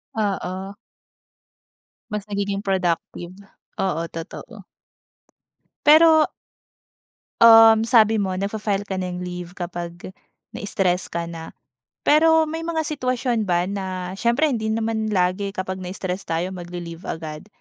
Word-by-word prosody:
Oo. 195 -2 -3 1.4
Mas 210 -1 -4
nagiging 200 -1 -2
productive. 180 -3 -2 0.5
Oo, 170 -4 0
totoo. 195 +5 -9 1.2
Pero 315 +1 +7 1.1
Um, 225 -1 +8
sabi 220 -3 +5
mo 190 -2 -2
nagfa-file 205 0 -2
ka 190 -1 -3
na 180 -1 -4
leave 180 0 -7
kapag 175 0 -6 0.4
na-stress 185 -3 -1
ka 170 0 -3
na. 165 -1 -9 0.5
Pero 320 +1 +4
may 325 +1 -4
mga 325 -1 -1
sitwasyon 255 -6 -1
ba 175 -1 +2
na 185 -2 -4
siyempre 245 +8 +2
hindi 225 -4 -2
naman 225 -1 -1
lagi 190 +2 0
kapag 185 0 -4
na-stress 185 0 -5
tayo 170 +3 -2
magle-leave 175 -1 -8
agad. 155 +1 -6
195 Hz, 110 wpm, -22 LUFS, 180-225 Hz, 1.4 s, Um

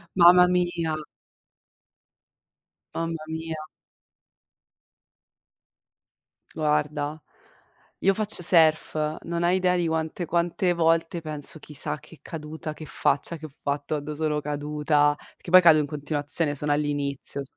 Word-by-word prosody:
Mamma 180 0 +7
mia. 175 -3 0 2.0
Mamma 165 -1 -4
mia. 160 0 -5 2.9
Guarda, 150 -1 -1 0.8
io 195 - +3
faccio 210 -3 -1
surf, 155 -2 +4
non 170 0 -3
hai 175 +1 +3
idea 180 -1 +2
di 175 -2 0
quante 160 +2 -2
quante 175 +2 0
volte 165 0 +1
penso: 155 0 -3
"Chissà 150 0 +1
che 160 +1 -16
caduta, 155 -1 -7
che 155 - -10
faccia 145 +4 -1
che 155 - -10
ho - - -17
fatto, 145 +1 -2
quando 150 +1 -5
sono 150 -1 -1
caduta", 150 0 0 0.2
perché - - -11
poi 185 +1 +8
cado 160 -3 +6
in 145 - -1
continuazione, 145 +1 0
sono 145 +1 -2
all'inizio. 145 -1 -1
155 Hz, 115 wpm, -25 LUFS, 150-170 Hz, 2.9 s, poi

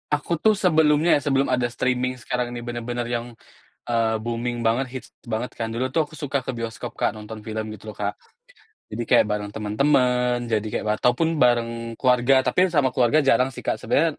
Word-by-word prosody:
Aku 150 +3 0
tuh 215 +7 +3
sebelumnya 160 -2 +4
ya, 145 - 0
sebelum 140 -1 +2
ada 125 -2 0
streaming 125 +1 -1
sekarang 125 +1 -2
ini 120 - -5
benar-benar 120 0 -4
yang, 120 0 -3 0.6
eee, 115 -1 +2
booming 120 +1 -3
banget, 115 +4 +1
hits 130 - -7 0.2
banget 115 +2 -3
kan. 115 - -1
Dulu 130 +3 -1
tuh 155 +3 +1
aku 155 - -16
suka 145 -2 -2
ke 130 - -3
bioskop, 115 -2 -6
Kak, - - +1
nonton 110 0 -9
film 110 0 -4
gitu 110 +1 -9
loh, - - -13
Kak. 100 0 -2 0.8
Jadi 115 +2 -3
kayak - - +5
bareng 105 -1 -2
teman-teman, 125 +2 +1
jadi 110 -2 +1
kayak 105 - -3
wa 105 0 0
ataupun 160 +7 +1
bareng 115 -2 +1
keluarga, 125 +2 +3
tapi 155 +9 +3
sama 140 -4 +3
keluarga 130 +5 +3
jarang 135 -1 +2
sih, - - -8
Kak. - - -1
Sebenarnya 160 0 +1
125 Hz, 195 wpm, -23 LUFS, 115-135 Hz, 0.8 s, kayak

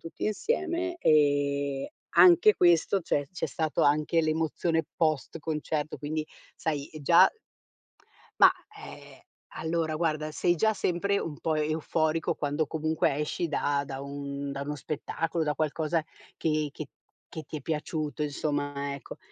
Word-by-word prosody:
tutti 165 - -7
insieme 350 - -1
e 145 - +2 0.2
anche 360 +4 +7
questo, 175 +3 +4
c'è 145 -3 0
c'è 185 - -4
stato 160 -3 -1
anche 150 +3 +3
l'emozione 160 +1 0
post 155 -5 0
concerto, 155 -1 -3
quindi 155 +1 -3 0.3
sai 145 -3 -2
già 170 +5 +7 1.1
ma, - - +8 0.3
ehm, - - -11 0.4
allora 160 -1 -1
guarda, 155 -1 -1
sei 175 +3 +1
già 220 +6 +2
sempre 200 +1 0
un 150 -3 -5
po' 160 - 0
euforico 155 +1 0
quando 145 +1 -1
comunque 155 -1 0
esci 150 +3 -2
da 145 -1 0
da 135 -1 -6
un 140 0 -5
da 140 0 -5
uno 150 +1 -3
spettacolo, 160 +3 -3
da 150 -1 0
qualcosa 155 +1 0 0.3
che 155 -2 0
che 155 - -6 0.4
che 160 - -6
ti 155 - -6
è 145 - -9
piaciuto, 155 0 -3
insomma, 145 -1 -2
ecco. 140 - -10
155 Hz, 135 wpm, -28 LUFS, 145-165 Hz, 1.1 s, ma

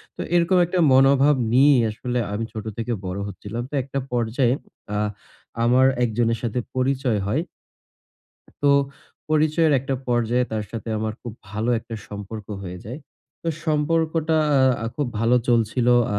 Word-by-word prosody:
তো - - -6
এরকম 175 +2 +3
একটা 180 +1 -1
মনোভাব 135 +2 +5 0.2
নিয়েই 135 0 +5
আসলে 120 +3 -3
আমি 115 +2 -2
ছোট 110 0 -6
থেকে 115 +1 -2
বড় 90 +2 -3
হচ্ছিলাম। 105 +5 -6
তো - - -18
একটা 140 +1 -4
পর্যায়ে 120 +1 +1 0.4
আ - - 0 0.7
আমার 125 +2 +4 0.2
একজনের 115 0 +1
সাথে 120 +2 -1 0.2
পরিচয় 130 -4 +1
হয়। 140 +10 +1 1.2
তো - - +2 0.6
পরিচয়ের 155 0 +3
একটা 135 0 -2
পর্যায়ে 120 +1 +2
তার 105 -1 -2
সাথে 115 0 -6
আমার 110 0 -2
খুব 120 -3 -6 0.2
ভালো 110 +3 -1
একটা 115 - -9
সম্পর্ক 105 0 -7 0.2
হয়ে 90 -1 -7
যায়। 125 +7 -6 0.4
তো 165 - -2 0.2
সম্পর্কটা 160 +1 +1 0.5
আ - - -1
খুব 145 -3 0
ভালো 120 +2 +4
চলছিল। 120 +1 +2 0.3
আ - - +1
125 Hz, 150 wpm, -23 LUFS, 110-140 Hz, 1.2 s, মনোভাব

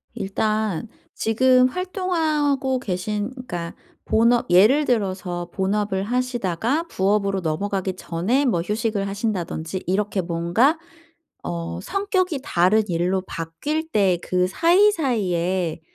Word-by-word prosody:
일단 215 0 -1 0.3
지금 255 +3 +3
활동하고 310 -6 0
계신 205 0 -3
그러니까 180 -10 -6 0.3
본업 235 +2 +3
예를 220 +12 +5
들어서 185 -7 -2
본업을 195 0 0
하시다가 245 - -1
부업으로 195 -2 +1
넘어가기 190 +3 -2
전에 185 +12 0
뭐 180 -10 +1
휴식을 210 +1 -1
하신다든지 190 -4 -3
이렇게 195 +1 0
뭔가 175 - +2 0.7
어 85 0 -4
성격이 370 - -1
다른 185 +4 +3
일로 180 +2 0
바뀔 290 - -4
때 195 - +2
그 180 0 +1
사이사이에 205 - +2
205 Hz, 260 characters per minute, -22 LUFS, 180-255 Hz, 0.7 s, 예를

